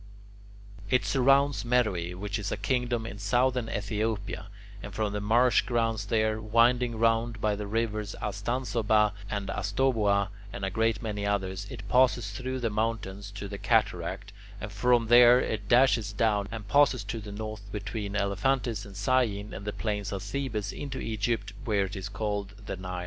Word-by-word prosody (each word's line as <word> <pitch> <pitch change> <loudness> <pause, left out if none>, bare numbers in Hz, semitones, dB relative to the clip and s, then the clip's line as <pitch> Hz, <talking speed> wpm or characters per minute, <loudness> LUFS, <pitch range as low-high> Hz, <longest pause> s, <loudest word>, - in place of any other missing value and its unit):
It 125 0 +2
surrounds 135 +1 +3
Meroe, 100 -8 0
which 100 +1 -3
is 105 -1 -3
a - - -1
kingdom 125 -3 -1
in 105 -3 -7
southern 120 +3 +1
Ethiopia, 105 -1 -2 0.3
and 105 - -8
from 105 -2 -1
the 105 - -2
marsh 120 +4 +4
grounds 115 -3 -1
there, 110 0 +1
winding 115 +2 +3
round 115 0 +1
by 105 -1 +1
the 105 0 -5
rivers 110 -1 -2
Astansoba 105 -1 +1 0.2
and 100 -2 -3
Astoboa 100 -2 +1 0.2
and 95 - -4
a 95 - -2
great 110 +2 0
many 105 -2 -3
others, 100 -1 -2
it 105 -5 -8
passes 120 -3 +3
through 130 +5 -4
the 115 -2 0
mountains 105 -2 -2
to 100 0 -5
the 100 0 -7
Cataract, 100 -2 0 0.3
and 105 +1 -6
from 120 +2 +3
there 120 +1 +7
it 105 -4 -3
dashes 120 -4 +4
down, 105 -2 +1
and 110 -2 -6
passes 140 -4 +4
to 110 +3 -4
the 105 -1 -8
north 105 -1 -7
between 100 0 -4
Elephantis 105 +2 0
and 100 -1 -11
Syene 105 -2 +1
and 100 - -7
the 105 - -2
plains 105 -3 -3
of 100 -1 -4
Thebes 110 -3 -3
into 135 -2 -5
Egypt, 110 -1 -2
where 105 -5 +1
it 95 +3 -7
is 95 0 -5
called 105 -1 -3
the - - -4
Nile. 90 -1 -5
105 Hz, 170 wpm, -28 LUFS, 100-120 Hz, 0.3 s, there